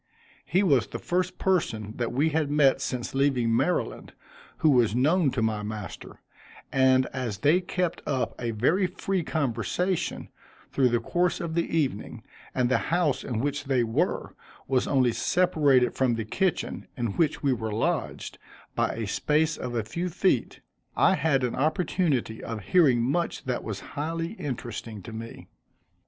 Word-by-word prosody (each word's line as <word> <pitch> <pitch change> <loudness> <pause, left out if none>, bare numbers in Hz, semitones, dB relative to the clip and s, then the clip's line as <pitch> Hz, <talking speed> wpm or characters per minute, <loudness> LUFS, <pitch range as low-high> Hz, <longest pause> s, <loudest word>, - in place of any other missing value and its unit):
He 185 +5 +2
was 140 - +3
the - - -5
first 180 +1 -1
person 110 - 0
that 120 -1 -1
we 140 +6 +2
had 155 -1 0
met 140 -2 +4
since 125 -2 -3
leaving 130 -4 +2
Maryland, - - -1 0.4
who 155 - +4
was 120 -5 +3
known 155 +5 +3
to 125 -3 -1
my 110 -1 0
master, 105 -1 -7 0.5
and 130 -1 +4
as 125 -6 -3
they 150 - +3
kept 180 -1 -2
up 135 -3 -1
a 120 - -1
very 145 - +2
free 190 +1 -2
conversation, 155 - -1 0.4
through 130 -2 +3
the 120 0 +2
course 175 +9 0
of 170 -2 -4
the 165 0 0
evening, 135 -10 -2 0.3
and 125 -1 +2
the 130 - +2
house 165 -5 +1
in 115 -3 -2
which 145 +1 -2
they 130 -3 +2
were, 115 -1 -1 0.3
was 130 -1 +1
only 130 -3 +3
separated 145 -5 +3
from 130 -3 +1
the 115 -1 -3
kitchen, 185 - -1
in 120 -4 -1
which 155 - 0
we 140 -2 +3
were 110 -2 -3
lodged, 110 +2 -2 0.3
by - - 0
a 115 - -3
space 150 +9 +1
of 125 -1 -5
a 115 - 0
few 170 - -3
feet, 175 - 0 0.4
I - - +5
had 140 -3 +1
an 125 - 0
opportunity 150 -5 0
of 115 -2 -5
hearing 130 - +4
much 170 +8 -1
that 125 -1 -2
was 105 -2 -5
highly 165 +3 -3
interesting 120 - -6
to 115 - -9
me. 115 +1 -8
135 Hz, 165 wpm, -27 LUFS, 120-165 Hz, 0.5 s, I